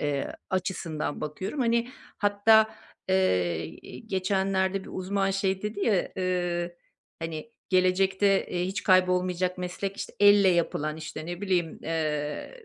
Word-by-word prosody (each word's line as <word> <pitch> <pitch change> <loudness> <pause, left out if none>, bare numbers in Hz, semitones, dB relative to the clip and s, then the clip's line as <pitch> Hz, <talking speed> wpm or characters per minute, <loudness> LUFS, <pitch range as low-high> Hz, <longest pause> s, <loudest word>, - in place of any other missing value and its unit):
eee, 145 -2 -1 0.2
açısından 175 -5 -2
bakıyorum. 185 - -4
Hani, 235 0 +2 0.3
hatta, 215 +2 +5 0.4
eee, 90 - +2 0.2
iii, 225 - -11
geçenlerde 190 0 0
bir - - -10
uzman 195 +1 0
şey 195 0 0
dedi 210 -1 -4
ya, 200 -5 +2
eee, 175 -2 -1 0.4
hani, 165 +7 -5 0.2
"Gelecekte, 190 +1 +3
eee, 180 0 -1
hiç 195 +1 -3
kaybolmayacak 180 0 +2
meslek, 185 +2 -4
işte, - - -6
elle 205 -1 +7
yapılan, 155 -3 0
işte, 155 0 -7
ne 175 +1 -5
bileyim, 180 -5 0
eee, 155 - -3
185 Hz, 130 wpm, -27 LUFS, 170-195 Hz, 0.4 s, elle